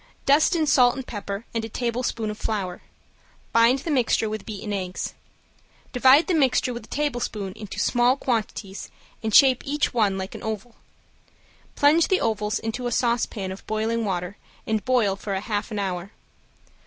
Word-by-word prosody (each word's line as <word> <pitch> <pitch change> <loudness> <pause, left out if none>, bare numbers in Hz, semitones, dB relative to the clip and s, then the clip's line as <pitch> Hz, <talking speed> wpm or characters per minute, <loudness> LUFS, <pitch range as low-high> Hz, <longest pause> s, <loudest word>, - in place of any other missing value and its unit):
Dust 295 +6 +4
in 320 -2 +2
salt 250 -4 +4
and 265 - -6
pepper 205 -1 -6
and 230 -1 -1
a 225 - -5
tablespoonful 235 -2 -2
of 210 - -9
flour. 190 -5 -3 0.7
Bind 230 +3 +5
the 330 - -1
mixture 245 -4 +2
with 215 +2 -6
beaten 210 -1 -5
eggs. 185 -2 -4 0.8
Divide 265 +5 +6
the 370 - 0
mixture 265 -4 +2
with 235 - -7
a - - -21
tablespoon 245 -9 -2
into 210 -2 -8
small 245 +2 +3
quantities 220 -6 -3 0.3
and 220 - -2
shape 260 +2 +6
each 290 0 -1
one 210 -5 +2
like 190 0 -5
an - - -8
oval. 220 +2 -5 1.0
Plunge 305 +3 +4
the 375 - +2
ovals 210 -1 0
into 225 +3 -3
a - - -3
saucepan 230 -5 0
of 190 - -10
boiling 220 +2 -1
water 185 -1 -3 0.3
and 220 -1 -1
boil 240 -7 +2
for 200 +1 -5
a - - -1
half 205 0 -3
an 215 - -5
hour. 190 -2 -3
225 Hz, 170 wpm, -24 LUFS, 205-255 Hz, 1.0 s, Divide